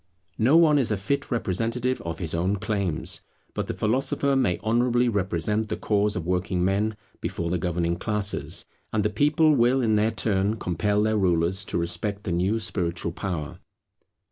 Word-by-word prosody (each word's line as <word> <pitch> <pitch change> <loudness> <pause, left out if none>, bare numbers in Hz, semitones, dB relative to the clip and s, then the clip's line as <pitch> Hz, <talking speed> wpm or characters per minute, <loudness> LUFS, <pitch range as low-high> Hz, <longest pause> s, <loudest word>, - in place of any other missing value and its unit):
No 130 +8 +5
one 155 -3 +5
is 130 - +1
a 105 - 0
fit 120 +9 -2
representative 115 +3 -1
of 85 -1 -5
his 85 -3 -5
own 90 +4 +1
claims; 100 -5 -1 0.3
but - - -3
the - - -3
philosopher 135 +4 +1
may 120 -10 +2
honourably 120 +2 +2
represent 105 +1 0
the - - -2
cause 105 -1 +1
of 90 - -3
working 90 0 0
men 105 +3 0 0.2
before 85 0 -3
the 90 - 0
governing 85 0 -1
classes; 105 +1 -1 0.3
and 105 -2 0
the 105 - +1
people 150 +7 +3
will 125 0 +3
in 110 -4 +2
their 105 +1 +3
turn 105 -2 0
compel 105 +3 0
their 110 0 +1
rulers 90 0 +1
to - - -2
respect 100 +4 -2
the 90 - -3
new 90 +6 +1
spiritual 85 -5 -2
power. 85 -4 -5
105 Hz, 170 wpm, -25 LUFS, 90-115 Hz, 0.3 s, No